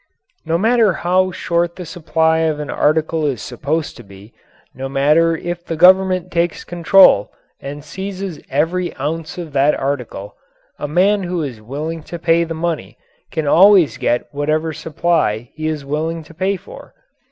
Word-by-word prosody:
No 165 +1 +1
matter 220 0 +3
how 185 +3 +1
short 170 -1 -1
the 180 - -7
supply 160 -1 0
of 160 -2 0
an 150 - -5
article 155 +1 +1
is 130 -6 -2
supposed 155 +6 -3
to - - -11
be, 100 +3 -15 0.4
no 135 +1 -6
matter 150 +5 +3
if 175 +1 -5
the 165 - -4
Government 185 +1 +4
takes 170 -1 -1
control 175 - +4 0.3
and 145 +1 -7
seizes 190 +2 -6
every 165 +6 -1
ounce 155 +5 -4
of 165 -5 -7
that 140 +2 +3
article, 125 -7 -4 0.4
a 145 - -3
man 190 +7 +2
who 175 -2 -2
is 125 -7 -6
willing 150 +8 -5
to 170 - -6
pay 170 0 +2
the 165 -1 -5
money 165 0 -3 0.3
can 160 -2 -3
always 185 +2 +5
get 120 - 0
whatever 155 +2 -1
supply 150 -9 -1
he 155 0 -4
is 155 -3 -3
willing 160 +3 -3
to 155 - -16
pay 190 +4 -1
for. 180 - -14
160 Hz, 165 wpm, -18 LUFS, 145-175 Hz, 0.4 s, always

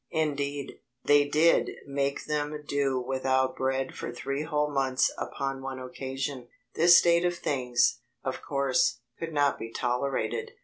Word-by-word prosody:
Indeed, 145 -2 -2 0.3
they 145 0 +5
did 155 +3 +3
make 140 0 -2
them 150 0 -2
do 140 -2 +1
without 130 0 0
bread 130 0 -1
for - - -5
three 140 +3 -3
whole 150 -1 0
months 135 -2 +2
upon 135 -1 -4
one 135 0 -5
occasion. 130 0 -5 0.3
This 170 +1 +7
state 170 0 +4
of 175 0 +1
things, 125 -6 +1 0.2
of - - -3
course, 135 -3 +1 0.2
could 165 0 -4
not 145 -2 +2
be 115 - -5
tolerated. 125 -1 -2
140 Hz, 140 wpm, -28 LUFS, 130-150 Hz, 0.3 s, This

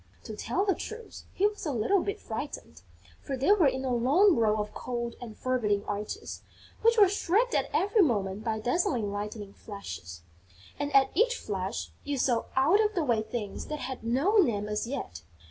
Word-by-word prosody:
To 220 - -7
tell 330 - -1
the 390 - +3
truth, 450 +6 -8
he 390 - +1
was 420 0 -1
a 305 - -1
little 280 - +2
bit 405 +3 -3
frightened, 220 - -6 0.4
for 270 - -4
they 275 +10 +3
were 380 -8 +5
in 265 0 -1
a 255 - 0
long 295 - +4
row 220 -3 +2
of 210 0 -3
cold 235 -1 -4
and 225 -3 -8
forbidding 215 -6 0
arches, 205 +1 -5 0.4
which 460 +1 +4
were 410 -2 +8
streaked 405 +5 +1
at - - +1
every 410 +2 +3
moment 205 - +1
by 220 -1 -1
dazzling 245 - 0
lightning 205 0 -5
flashes; 85 - -8 0.6
and, 290 0 -2
at 270 -1 +4
each 480 +7 +3
flash, 195 - -4
you 290 -1 -2
saw 245 -2 +1
out 330 +11 +4
of 420 0 0
the 345 - +1
way 235 -4 +2
things 215 -2 -5
that 305 - -3
had 260 -3 -5
no 275 - +2
name 220 - +3
as 210 +2 -2
yet. 240 - -5
250 Hz, 190 wpm, -29 LUFS, -, 0.6 s, were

